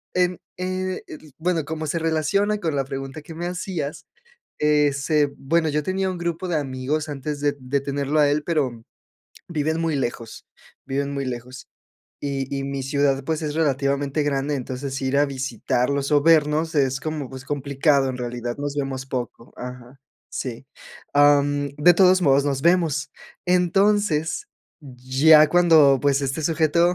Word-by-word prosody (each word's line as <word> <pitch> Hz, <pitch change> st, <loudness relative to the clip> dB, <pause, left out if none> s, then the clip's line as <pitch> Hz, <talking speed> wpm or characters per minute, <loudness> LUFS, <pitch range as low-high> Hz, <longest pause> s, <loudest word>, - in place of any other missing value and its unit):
em, 180 Hz, -1 st, +2 dB, 0.2 s
eh, 185 Hz, 0 st, -3 dB
el 155 Hz, -2 st, -12 dB
bueno, 170 Hz, -1 st, 0 dB
como 160 Hz, 0 st, -4 dB
se 170 Hz, -, -1 dB
relaciona 165 Hz, +6 st, +1 dB
con 160 Hz, -5 st, -2 dB
la 135 Hz, -1 st, 0 dB
pregunta 135 Hz, +2 st, -6 dB
que 160 Hz, -, -11 dB
me 170 Hz, +2 st, -4 dB
hacías, 180 Hz, -5 st, -4 dB, 0.6 s
eh, 150 Hz, -1 st, +3 dB
se 145 Hz, +1 st, +1 dB
bueno, 160 Hz, +3 st, +1 dB
yo 150 Hz, +1 st, 0 dB
tenía 190 Hz, +3 st, -1 dB
un 180 Hz, -, -5 dB
grupo 170 Hz, +1 st, -3 dB
de 165 Hz, -, 0 dB
amigos 140 Hz, +2 st, -3 dB
antes 145 Hz, +1 st, -5 dB
de 145 Hz, -1 st, 0 dB
de 130 Hz, +2 st, -1 dB
tenerlo 140 Hz, +2 st, -1 dB
a 145 Hz, -, +4 dB
él, 150 Hz, +1 st, 0 dB
pero 130 Hz, -9 st, -1 dB, 0.7 s
viven 160 Hz, 0 st, -1 dB
muy 160 Hz, -3 st, 0 dB
lejos, 120 Hz, -3 st, -4 dB, 0.4 s
viven 140 Hz, +1 st, -2 dB
muy 140 Hz, -1 st, -3 dB
lejos, 125 Hz, +1 st, -7 dB, 0.5 s
y 135 Hz, -2 st, -3 dB
y 135 Hz, -, -3 dB
mi 140 Hz, -1 st, -3 dB
ciudad, 140 Hz, 0 st, +1 dB
pues, 160 Hz, +1 st, -2 dB
es 150 Hz, -1 st, -3 dB
relativamente 140 Hz, -1 st, 0 dB
grande, 145 Hz, 0 st, 0 dB
entonces 130 Hz, +1 st, -5 dB
ir 135 Hz, +1 st, 0 dB
a 145 Hz, -, +5 dB
visitarlos 135 Hz, +1 st, -1 dB
o 145 Hz, -, +5 dB
vernos 160 Hz, 0 st, +3 dB
es 135 Hz, -2 st, +2 dB
como, 155 Hz, -4 st, -4 dB
pues, 130 Hz, -1 st, -9 dB
complicado, 140 Hz, 0 st, +1 dB
en 130 Hz, -, -5 dB
realidad 120 Hz, -1 st, -4 dB
nos 145 Hz, 0 st, -3 dB
vemos 135 Hz, -1 st, -3 dB
poco, 120 Hz, -2 st, -6 dB
ajá, 125 Hz, +1 st, -9 dB, 0.3 s
sí, 125 Hz, 0 st, -5 dB, 0.5 s
am, 145 Hz, 0 st, +4 dB
de 175 Hz, +4 st, +6 dB
todos 185 Hz, +1 st, +5 dB
modos 140 Hz, -3 st, +4 dB
nos 140 Hz, -2 st, -1 dB
vemos, 165 Hz, -4 st, +2 dB, 0.4 s
entonces, 180 Hz, -, +2 dB, 0.6 s
ya 155 Hz, +4 st, +7 dB
cuando, 160 Hz, -6 st, +5 dB
pues, 140 Hz, -1 st, +2 dB
este 140 Hz, +3 st, -2 dB
sujeto 165 Hz, +2 st, +2 dB
145 Hz, 160 wpm, -23 LUFS, 135-160 Hz, 0.7 s, ya